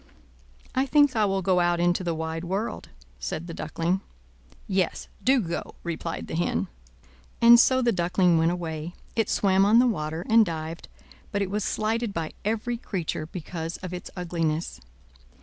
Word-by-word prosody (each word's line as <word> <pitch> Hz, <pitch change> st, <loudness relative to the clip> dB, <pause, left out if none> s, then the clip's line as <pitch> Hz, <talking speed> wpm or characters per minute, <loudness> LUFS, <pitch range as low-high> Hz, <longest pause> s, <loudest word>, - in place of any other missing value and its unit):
"I 265 Hz, +1 st, +1 dB
think 290 Hz, -2 st, +4 dB
I 215 Hz, -2 st, +3 dB
will 195 Hz, -1 st, 0 dB
go 185 Hz, 0 st, +3 dB
out 175 Hz, 0 st, +2 dB
into 175 Hz, +1 st, +2 dB
the 170 Hz, -2 st, -1 dB
wide 160 Hz, +1 st, -3 dB
world," 195 Hz, +6 st, -3 dB, 0.3 s
said 70 Hz, -, -4 dB
the 170 Hz, -, -7 dB
Duckling. 175 Hz, +4 st, -1 dB, 0.7 s
"Yes, 190 Hz, -3 st, 0 dB, 0.2 s
do 265 Hz, +1 st, +4 dB
go," 170 Hz, -6 st, -4 dB
replied 165 Hz, -1 st, -4 dB
the -, -, -8 dB
Hen. 95 Hz, -, 0 dB, 0.7 s
And 235 Hz, 0 st, +8 dB
so 260 Hz, +1 st, +4 dB
the 240 Hz, -, +3 dB
Duckling 175 Hz, -2 st, +2 dB
went 165 Hz, +1 st, +3 dB
away. 170 Hz, -1 st, -4 dB, 0.2 s
It 225 Hz, -, +1 dB
swam 195 Hz, -1 st, +3 dB
on 210 Hz, +3 st, +5 dB
the 245 Hz, -, +6 dB
water, 160 Hz, -6 st, -2 dB
and 225 Hz, 0 st, +6 dB
dived, 165 Hz, -2 st, -5 dB, 0.4 s
but 200 Hz, 0 st, 0 dB
it 190 Hz, -, -4 dB
was 210 Hz, 0 st, -1 dB
slighted 220 Hz, 0 st, -1 dB
by 160 Hz, -1 st, -3 dB
every 225 Hz, +3 st, -1 dB
creature 170 Hz, -8 st, -3 dB
because 165 Hz, -1 st, -5 dB
of 185 Hz, -1 st, -5 dB
its 180 Hz, -, -6 dB
ugliness. 165 Hz, -2 st, -2 dB
180 Hz, 165 wpm, -26 LUFS, 165-215 Hz, 0.7 s, And